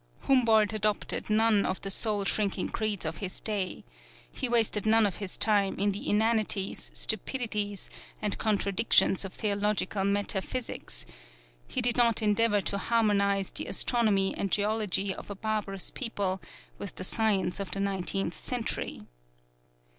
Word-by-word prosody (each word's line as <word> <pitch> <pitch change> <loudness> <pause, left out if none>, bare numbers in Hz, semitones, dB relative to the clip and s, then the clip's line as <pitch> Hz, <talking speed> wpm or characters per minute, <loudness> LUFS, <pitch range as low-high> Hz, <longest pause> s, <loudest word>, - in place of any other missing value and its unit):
Humboldt 225 -5 +3
adopted 215 0 -1
none 215 -1 +3
of 185 - -2
the 195 - -2
soul 205 0 +1
shrinking 200 -2 0
creeds 215 -5 -1
of 160 0 -3
his 185 +3 -5
day; 205 -4 -3 0.5
he 255 - -3
wasted 220 -3 +2
none 220 0 +5
of 200 - -1
his 200 -3 -4
time 205 -3 +2
in 200 +1 +1
the 200 - -4
inanities, 215 -2 0
stupidities 210 -2 -1 0.3
and 210 -1 0
contradictions 200 -2 +2
of 195 - -7
theological 205 -1 0
metaphysics; 200 +4 -2 0.6
he - - -1
did 240 0 +4
not 235 -2 +3
endeavor 210 0 +3
to 200 +2 -2
harmonize 200 -4 +1
the - - -3
astronomy 210 -5 +2
and 195 - -2
geology 205 -2 +1
of - - -10
a 200 - -5
barbarous 205 -2 -3
people 200 -7 -2 0.4
with - - -7
the - - -6
science 200 -3 +1
of 200 - -4
the 195 - +1
Nineteenth 195 -2 -2
Century. 245 -3 -4
205 Hz, 140 wpm, -29 LUFS, 195-220 Hz, 0.6 s, none